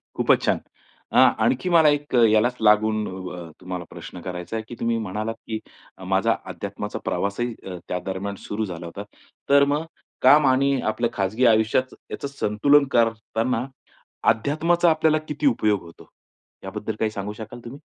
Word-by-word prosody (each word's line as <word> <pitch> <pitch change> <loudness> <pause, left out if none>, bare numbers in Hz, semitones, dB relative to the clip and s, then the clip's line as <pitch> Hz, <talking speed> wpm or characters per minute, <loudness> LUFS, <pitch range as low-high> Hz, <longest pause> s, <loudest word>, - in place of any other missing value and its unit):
खूपच - - +3
छान, - - +2 0.6
आ - - +8 0.2
आणखी 185 - +1
मला 160 -3 +6
एक 145 -2 -6 0.2
यालाच 120 +3 +3
लागून 110 0 +3 0.2
अ, 85 -2 -8
तुम्हाला 90 -1 -5
प्रश्न 90 - -10
करायचा 90 +3 -6
आहे, 110 - -2
की 120 - -8
तुम्ही 115 0 0
म्हणालात 110 +2 -3
की 110 -1 -3 0.5
माझा 110 +4 +3
अध्यात्माचा - - -5
प्रवासही 115 +5 -1
अ, 90 -2 -6
त्या 90 - -2
दरम्यान 100 +1 -4
सुरू 110 +1 -2
झाला 85 -3 -7
होता. 90 +4 -7 0.5
तर 140 0 +6
मग 155 +2 -1 0.4
काम 145 -1 +6
आणि 135 +1 +3
आपल्या 115 +2 0
खाजगी 105 +5 0
आयुष्यात 110 +3 +3 0.2
याच - - -5
संतुलन 140 +8 +4
करतांना, 115 +1 0 0.7
अध्यात्माचा 155 +9 +2
आपल्याला 155 -1 +3
किती 150 0 -2
उपयोग 105 -6 +2
होतो, 85 -1 -15 0.6
याबद्दल 110 0 -4
काही 110 -1 +1
सांगू 105 0 -5
शकाल 110 +3 -9
तुम्ही? 135 +5 -9
110 Hz, 155 wpm, -23 LUFS, 100-130 Hz, 0.7 s, आ